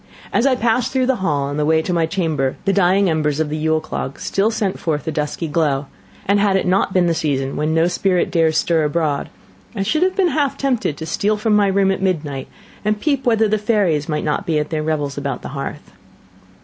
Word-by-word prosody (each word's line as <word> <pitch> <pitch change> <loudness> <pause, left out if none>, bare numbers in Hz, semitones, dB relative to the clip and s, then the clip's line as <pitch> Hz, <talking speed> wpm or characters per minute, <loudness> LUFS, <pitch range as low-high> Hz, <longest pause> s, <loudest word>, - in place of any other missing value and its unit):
As 245 - +3
I 265 - +3
passed 240 0 +1
through 260 -1 +1
the 260 0 +1
hall, 150 -8 0
on 140 +1 -3
the 150 - +1
way 160 +1 +3
to 180 - -2
my 165 -2 +1
chamber, 160 -7 -1
the 195 - +2
dying 195 +1 +3
embers 155 -3 0
of 160 -1 0
the 150 - -3
Yule 160 0 +1
clog 155 -3 -5
still 200 +3 +1
sent 205 -4 -2
forth 150 -3 -2
a - - 0
dusky 150 +2 -3
glow; 150 -3 0 0.4
and 200 +1 +3
had 200 -1 +2
it 190 - +1
not 185 +2 +2
been 185 -1 +3
the 170 - +2
season 135 -4 -1
when 155 +1 0
"no 165 +1 +4
spirit 180 0 +1
dares 160 -2 +2
stir 165 -1 +2
abroad," 150 -1 -1 0.5
I 195 - -1
should 310 - 0
have 370 +1 +2
been 380 -3 +3
half 285 -2 0
tempted 250 - -1
to 160 - -6
steal 205 +6 0
from 215 0 +1
my 205 -1 +4
room 195 0 +2
at 190 - -2
midnight, 150 -8 -2 0.4
and 210 0 0
peep 275 0 0
whether 225 -2 +3
the 215 +1 +1
fairies 195 -9 +1
might 150 -1 -1
not 155 +6 -2
be 160 -2 +1
at 150 +1 -2
their 155 -1 -1
revels 150 -3 -2
about 140 -3 -4
the - - -6
hearth. 140 0 -6
170 Hz, 235 wpm, -19 LUFS, 150-205 Hz, 0.5 s, no